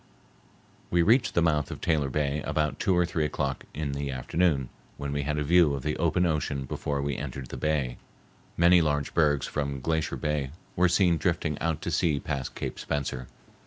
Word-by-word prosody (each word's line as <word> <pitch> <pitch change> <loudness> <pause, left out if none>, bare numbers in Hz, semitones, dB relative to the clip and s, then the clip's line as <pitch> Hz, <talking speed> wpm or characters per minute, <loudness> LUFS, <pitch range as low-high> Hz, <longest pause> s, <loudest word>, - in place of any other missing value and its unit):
We 85 -1 +3
reached 115 +5 +3
the 85 - +4
mouth 75 -3 +1
of - - -6
Taylor 75 -5 +1
Bay 75 +1 0
about 75 0 -1
two 95 -4 +2
or 90 - +4
three 85 -2 -1
o'clock 70 -2 -2
in 75 -2 -3
the 70 0 -3
afternoon, 70 +1 0 0.3
when 70 -1 -4
we 70 0 -1
had 75 +2 -2
a 75 - 0
view 80 -1 +4
of 70 - -6
the 75 +1 -1
open 85 +2 +2
ocean 75 -4 -1
before 70 +2 -2
we 70 -1 -1
entered 65 -2 -6
the - - -6
bay. 70 -6 0 0.6
Many 85 +1 +6
large 75 -3 0
bergs 75 -3 +3
from 70 -2 -3
Glacier 80 +3 -1
Bay 75 -3 -1 0.3
were 90 0 +4
seen 90 -2 +3
drifting 80 -1 0
out 80 -2 -1
to 85 - -2
sea 75 -2 +2
past 70 -4 -4
Cape - - -4
Spencer. 65 -3 -3
75 Hz, 195 wpm, -28 LUFS, 70-85 Hz, 0.6 s, Many